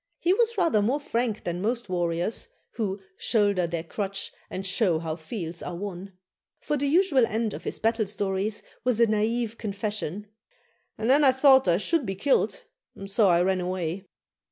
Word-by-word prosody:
He 355 Hz, -, +2 dB
was 465 Hz, +2 st, +1 dB
rather 335 Hz, -, +3 dB
more 250 Hz, +8 st, +1 dB
frank 235 Hz, -6 st, -2 dB
than 175 Hz, 0 st, -3 dB
most 235 Hz, +2 st, -1 dB
warriors, 175 Hz, -, -1 dB, 0.2 s
who 205 Hz, -3 st, -3 dB, 0.2 s
'shoulder 205 Hz, -6 st, +2 dB
their 165 Hz, -1 st, -3 dB
crutch, 195 Hz, +3 st, -4 dB, 0.2 s
and 190 Hz, +1 st, -5 dB
show 190 Hz, -3 st, +2 dB
how 160 Hz, -1 st, -3 dB
fields 165 Hz, 0 st, -6 dB
are 180 Hz, -, -5 dB
won;' 195 Hz, 0 st, -6 dB, 0.5 s
for 300 Hz, -, -2 dB
the 285 Hz, 0 st, 0 dB
usual 310 Hz, -4 st, +4 dB
end 220 Hz, 0 st, -1 dB
of -, -, -8 dB
his -, -, -3 dB
battle 225 Hz, -1 st, +1 dB
stories 200 Hz, +1 st, -2 dB, 0.2 s
was 250 Hz, -2 st, +2 dB
the 235 Hz, -, +6 dB
naïve 225 Hz, +1 st, 0 dB
confession, 205 Hz, -2 st, -3 dB, 0.7 s
'and 220 Hz, -, -2 dB
then 280 Hz, +4 st, +5 dB
I 270 Hz, -, +7 dB
thought 265 Hz, 0 st, +5 dB
I 170 Hz, -1 st, +4 dB
should 290 Hz, -, 0 dB
be 195 Hz, -, -2 dB
killed, 265 Hz, +9 st, +1 dB, 0.3 s
and 195 Hz, -, -8 dB
so 200 Hz, +1 st, +3 dB
I 175 Hz, -1 st, +4 dB
ran 190 Hz, 0 st, +1 dB
away.' 180 Hz, +1 st, -3 dB
205 Hz, 180 wpm, -26 LUFS, 185-240 Hz, 0.7 s, I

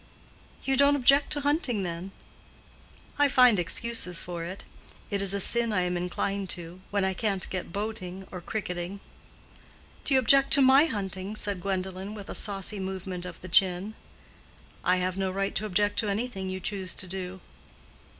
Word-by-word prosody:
"You 270 Hz, -, +1 dB
don't 280 Hz, +1 st, +5 dB
object 275 Hz, +1 st, +4 dB
to 290 Hz, -, -1 dB
hunting, 280 Hz, -, +1 dB
then?" 175 Hz, +1 st, -5 dB, 1.1 s
"I 290 Hz, -, +6 dB
find 250 Hz, -6 st, +5 dB
excuses 180 Hz, 0 st, 0 dB
for 175 Hz, -2 st, -6 dB
it. 185 Hz, +4 st, -7 dB, 0.5 s
It 200 Hz, -1 st, 0 dB
is 195 Hz, -1 st, +3 dB
a 200 Hz, -, 0 dB
sin 235 Hz, +3 st, +3 dB
I 195 Hz, -3 st, +1 dB
am 180 Hz, 0 st, -1 dB
inclined 185 Hz, +2 st, -2 dB
to—when 185 Hz, +3 st, -3 dB
I 190 Hz, -, 0 dB
can't 195 Hz, -1 st, -1 dB
get 185 Hz, -2 st, -4 dB
boating 195 Hz, -2 st, -5 dB
or 180 Hz, -, -7 dB
cricketing." 180 Hz, -1 st, -5 dB, 1.0 s
"Do 275 Hz, -, +3 dB
you -, -, +6 dB
object 275 Hz, +3 st, +5 dB
to 280 Hz, -, +6 dB
my 265 Hz, +3 st, +7 dB
hunting?" 195 Hz, -, -4 dB
said 205 Hz, -3 st, -1 dB
Gwendolen, 190 Hz, +1 st, -3 dB
with 205 Hz, -2 st, -8 dB
a -, -, -5 dB
saucy 200 Hz, 0 st, +1 dB
movement 190 Hz, -1 st, -5 dB
of 175 Hz, -, -9 dB
the 185 Hz, -, -8 dB
chin. 185 Hz, +3 st, +3 dB, 0.9 s
"I 180 Hz, -, +3 dB
have 185 Hz, 0 st, -2 dB
no 190 Hz, -1 st, 0 dB
right 195 Hz, +1 st, -2 dB
to 215 Hz, -, -2 dB
object 205 Hz, +1 st, +1 dB
to 215 Hz, -, 0 dB
anything 200 Hz, -2 st, -3 dB
you 185 Hz, 0 st, -4 dB
choose 190 Hz, -1 st, -3 dB
to -, -, -6 dB
do." 185 Hz, 0 st, -6 dB
195 Hz, 170 wpm, -27 LUFS, 185-220 Hz, 1.1 s, my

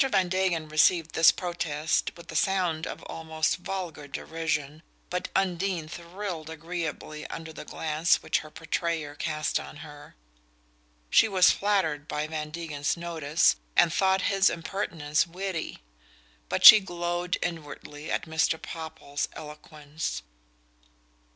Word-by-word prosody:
Van 185 Hz, -4 st, +2 dB
Degen 180 Hz, -4 st, 0 dB
received 155 Hz, +2 st, +3 dB
this 160 Hz, 0 st, +7 dB
protest 165 Hz, -4 st, -1 dB
with 170 Hz, -1 st, -11 dB
a -, -, -8 dB
sound 175 Hz, -3 st, +1 dB
of -, -, -7 dB
almost 160 Hz, -1 st, -1 dB
vulgar 180 Hz, -5 st, -5 dB
derision, 155 Hz, 0 st, -3 dB, 0.3 s
but 180 Hz, 0 st, -2 dB
Undine 185 Hz, -3 st, 0 dB
thrilled 170 Hz, -1 st, -6 dB
agreeably 160 Hz, -1 st, -5 dB
under 160 Hz, -1 st, -7 dB
the -, -, -9 dB
glance 160 Hz, +1 st, +1 dB
which -, -, +1 dB
her 155 Hz, -, -10 dB
portrayer 160 Hz, -1 st, -3 dB
cast 155 Hz, +1 st, -1 dB
on -, -, -9 dB
her. 145 Hz, -1 st, -13 dB, 1.0 s
She -, -, +6 dB
was 190 Hz, -3 st, +5 dB
flattered 170 Hz, -8 st, 0 dB
by 150 Hz, -1 st, -2 dB
Van 155 Hz, -1 st, -4 dB
Degen's 150 Hz, -2 st, -2 dB
notice, 165 Hz, -, +2 dB, 0.2 s
and 165 Hz, -, +5 dB
thought 190 Hz, 0 st, +2 dB
his 195 Hz, 0 st, +4 dB
impertinence 165 Hz, -3 st, -1 dB
witty; 180 Hz, -, -5 dB, 0.7 s
but -, -, +1 dB
she 215 Hz, -, +14 dB
glowed 175 Hz, -1 st, -2 dB
inwardly 150 Hz, -2 st, -6 dB
at -, -, -1 dB
Mr. 160 Hz, 0 st, +1 dB
Popple's 160 Hz, -3 st, -5 dB
eloquence. 150 Hz, -, -6 dB
160 Hz, 125 wpm, -27 LUFS, 155-180 Hz, 1.0 s, she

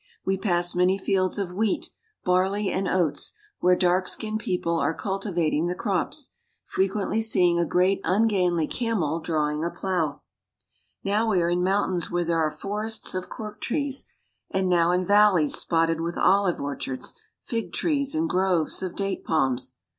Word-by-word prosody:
We 190 Hz, -, +2 dB
pass 175 Hz, -3 st, +1 dB
many 180 Hz, +2 st, +3 dB
fields 190 Hz, -1 st, 0 dB
of 190 Hz, -3 st, -3 dB
wheat, 210 Hz, +1 st, -1 dB, 0.3 s
barley, 190 Hz, +3 st, +2 dB
and 190 Hz, 0 st, -1 dB
oats, 170 Hz, -7 st, 0 dB, 0.3 s
where 180 Hz, 0 st, +4 dB
dark 180 Hz, +1 st, +2 dB
skinned 215 Hz, -1 st, -2 dB
people 180 Hz, -7 st, -1 dB
are 160 Hz, -, 0 dB
culti 195 Hz, 0 st, -3 dB
vating 165 Hz, -1 st, +1 dB
the 180 Hz, -, -2 dB
crops, 210 Hz, -, -2 dB, 0.3 s
frequently 195 Hz, +3 st, 0 dB
seeing 180 Hz, -6 st, +3 dB
a 170 Hz, -, +1 dB
great 185 Hz, +4 st, +2 dB
ungainly 180 Hz, -4 st, +2 dB
camel 180 Hz, -8 st, -1 dB
drawing 155 Hz, -2 st, -1 dB
a 170 Hz, -, 0 dB
plow. 175 Hz, -6 st, -2 dB, 0.8 s
Now 210 Hz, +3 st, +1 dB
we 195 Hz, -4 st, +3 dB
are 170 Hz, 0 st, +1 dB
in 175 Hz, +1 st, +1 dB
mountains 190 Hz, -2 st, +1 dB
where 175 Hz, 0 st, 0 dB
there 165 Hz, 0 st, +1 dB
are 155 Hz, -1 st, +2 dB
forests 210 Hz, +6 st, -3 dB
of 185 Hz, -1 st, -4 dB
cork 215 Hz, -3 st, -8 dB
trees, 280 Hz, +1 st, -2 dB, 0.4 s
and 190 Hz, -1 st, 0 dB
now 170 Hz, -2 st, +3 dB
in 180 Hz, +1 st, +1 dB
valleys 200 Hz, -6 st, +4 dB
spotted 165 Hz, -1 st, +1 dB
with 170 Hz, +1 st, -3 dB
olive 195 Hz, -2 st, +3 dB
or 140 Hz, 0 st, -3 dB
chards, 130 Hz, -1 st, -5 dB, 0.3 s
fig 225 Hz, -7 st, -3 dB
trees, 280 Hz, -, 0 dB
and 160 Hz, +1 st, +1 dB
groves 180 Hz, -3 st, +1 dB
of 185 Hz, -2 st, -4 dB
date 195 Hz, -1 st, -2 dB
palms. 135 Hz, -6 st, 0 dB
185 Hz, 165 wpm, -25 LUFS, 170-200 Hz, 0.8 s, where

